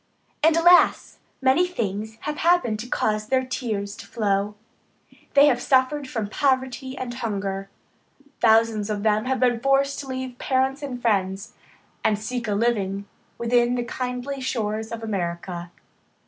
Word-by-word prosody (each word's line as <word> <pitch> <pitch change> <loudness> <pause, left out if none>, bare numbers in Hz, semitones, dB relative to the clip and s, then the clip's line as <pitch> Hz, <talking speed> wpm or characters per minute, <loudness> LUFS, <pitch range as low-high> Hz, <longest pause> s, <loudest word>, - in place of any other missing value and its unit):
And, 320 +1 +4
alas! 350 +2 +4 0.2
many 270 +8 +4
things 220 - -4
have 300 0 -4
happened 335 -11 +2
to 235 - -6
cause 215 -3 -1
their 260 +1 +1
tears 210 -6 -3
to 200 - -10
flow. 205 -1 0 0.8
They 280 +1 +8
have 250 -4 +3
suffered 265 +2 +2
from 220 -5 -2
poverty 260 +1 -1
and 250 -2 -4
hunger. 195 -4 -3 0.7
Thousands 220 -2 +3
of 205 -1 -2
them 215 +1 +2
have 260 0 0
been 245 -2 +2
forced 275 +2 +2
to 280 - -7
leave 260 -1 -5
parents 265 +1 0
and 265 -4 -5
friends, 195 -3 -1 0.5
and 210 - +2
seek 235 +2 -4
a 205 - 0
living 200 -3 0 0.3
within 240 +1 +2
the 245 - -1
kindly 250 +3 -4
shores 220 -3 -2
of 230 -1 -6
America. 175 -3 -4
235 Hz, 150 wpm, -24 LUFS, 210-260 Hz, 0.8 s, They